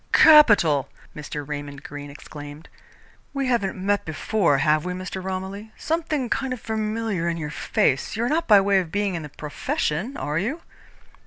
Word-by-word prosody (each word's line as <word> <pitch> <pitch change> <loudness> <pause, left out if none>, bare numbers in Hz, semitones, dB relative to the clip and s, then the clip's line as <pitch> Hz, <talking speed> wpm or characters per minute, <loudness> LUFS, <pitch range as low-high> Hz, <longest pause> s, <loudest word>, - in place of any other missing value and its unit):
"Capital!" 210 - +6 0.3
Mr. 145 -1 -6
Raymond 145 -1 -6
Greene 145 0 -8
exclaimed. 145 +2 -10 0.7
"We 275 -1 0
haven't 235 -7 0
met 205 +1 +1
before, 160 -1 +1
have 150 +2 +2
we, 180 - -3
Mr. 185 +1 -6
Romilly? 190 +3 -5
Something 315 -5 -1
kind 265 +2 -1
of 250 - -6
familiar 215 -5 -2
in 170 - -2
your 150 -2 -4
face. 135 -1 0
You 225 - -1
are - - +1
not 330 +3 0
by 205 -3 +7
way 195 0 +3
of 175 -4 -4
being 205 0 0
in 170 - -3
the 150 - -8
Profession, 150 - -3
are 150 +2 -1
you?" 270 - -3
190 Hz, 170 wpm, -24 LUFS, 150-220 Hz, 0.7 s, by